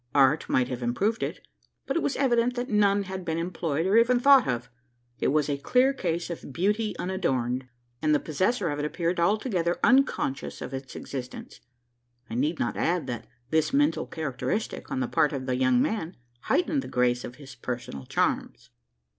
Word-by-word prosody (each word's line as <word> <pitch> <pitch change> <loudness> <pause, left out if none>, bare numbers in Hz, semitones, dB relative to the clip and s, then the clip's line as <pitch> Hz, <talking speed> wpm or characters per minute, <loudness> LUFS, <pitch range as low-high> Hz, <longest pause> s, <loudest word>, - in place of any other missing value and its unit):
Art 140 +2 +4
might 125 -1 +2
have 125 -1 -4
improved 195 - 0
it; - - -3 0.4
but - - -2
it 335 - +2
was 285 - 0
evident 245 -2 +2
that 245 +1 -3
none 205 -1 +3
had 190 -1 -6
been 165 -2 -2
employed, 165 -2 -2
or 195 +4 +4
even 240 +2 +5
thought 275 -1 +6
of. 120 -1 -2 0.5
It - - +1
was 150 0 +2
a 140 -1 -1
clear 255 - +3
case 175 -8 -2
of 165 - -7
"beauty 210 - 0
unadorned;" 130 -9 -1 0.3
and 155 -1 +3
the - - +3
possessor 185 - 0
of 145 - -3
it 145 - -1
appeared 170 +3 -1
altogether 180 -2 +1
unconscious 255 - +2
of - - -6
its 135 0 -6
existence. 125 -3 -7 0.7
I - - -4
need 150 +7 0
not 120 - -1
add 175 0 +1
that 120 -2 -5 0.2
this 160 - +2
mental 290 +2 +2
characteristic, 155 - -3
on 130 - -2
the 125 - 0
part 150 - +2
of 130 -2 -3
the 130 -1 0
young 130 -1 +3
man, 180 - -1 0.3
heightened 300 -1 +1
the - - -8
grace 125 0 +1
of 120 - -7
his 140 -1 -12
personal 120 - -6
charms. - - -1
165 Hz, 185 wpm, -27 LUFS, 130-210 Hz, 0.7 s, thought